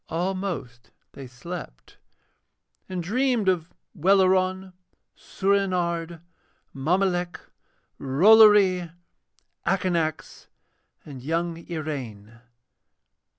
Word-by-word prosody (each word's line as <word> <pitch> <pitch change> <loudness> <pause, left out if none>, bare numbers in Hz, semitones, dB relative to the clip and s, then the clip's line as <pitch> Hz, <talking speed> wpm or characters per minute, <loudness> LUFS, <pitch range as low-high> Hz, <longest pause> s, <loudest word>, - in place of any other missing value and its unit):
Almost 165 - -4 0.2
they 135 -2 -10
slept, 125 - -10 0.9
and 180 -2 -4
dreamed 240 +2 0
of 180 -3 0 0.2
Welleran, 185 +1 +2 0.4
Soorenard, 175 -4 -1 0.5
Mommolek, 175 +4 -1 0.6
Rollory, 190 +3 +5 0.7
Akanax, 170 -5 -2 0.6
and 135 -4 -10
young 165 +4 -2
Iraine. 125 -9 -6
175 Hz, 65 wpm, -25 LUFS, 155-190 Hz, 0.9 s, Rollory